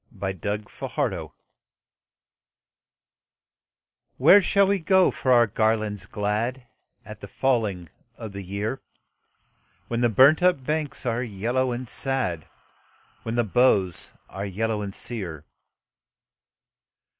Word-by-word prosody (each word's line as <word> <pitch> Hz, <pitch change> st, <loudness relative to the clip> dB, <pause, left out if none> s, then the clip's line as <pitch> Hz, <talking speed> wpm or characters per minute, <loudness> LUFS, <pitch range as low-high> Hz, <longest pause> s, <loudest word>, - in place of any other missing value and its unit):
A 95 Hz, -1 st, -2 dB
Song 105 Hz, +3 st, -4 dB, 0.2 s
of -, -, -6 dB
Autumn -, -, -1 dB, 2.9 s
"Where 170 Hz, +10 st, +7 dB
shall 200 Hz, +1 st, +3 dB
we 200 Hz, 0 st, +1 dB
go 190 Hz, +2 st, +4 dB
for 130 Hz, -, -1 dB
our 120 Hz, -1 st, +6 dB
garlands 110 Hz, -1 st, -1 dB
glad 110 Hz, +5 st, -2 dB, 0.4 s
At -, -, -10 dB
the -, -, -9 dB
falling 110 Hz, -9 st, -1 dB, 0.3 s
of 110 Hz, -4 st, -8 dB
the 100 Hz, 0 st, -7 dB
year, 100 Hz, +7 st, -4 dB, 1.1 s
When 120 Hz, 0 st, -1 dB
the 120 Hz, -, +3 dB
burnt 135 Hz, -, +5 dB
up 180 Hz, -7 st, +3 dB
banks 150 Hz, 0 st, -3 dB
are 120 Hz, 0 st, 0 dB
yellow 120 Hz, +3 st, -1 dB
and 120 Hz, +1 st, -5 dB
sad, 120 Hz, -, -2 dB, 0.7 s
When 115 Hz, 0 st, -4 dB
the 120 Hz, -, +2 dB
boughs 100 Hz, -5 st, +1 dB
are 95 Hz, -, -7 dB
yellow 105 Hz, +2 st, -2 dB
and 100 Hz, -1 st, -6 dB
sere? 85 Hz, -, -6 dB
115 Hz, 120 wpm, -24 LUFS, 100-130 Hz, 2.9 s, Where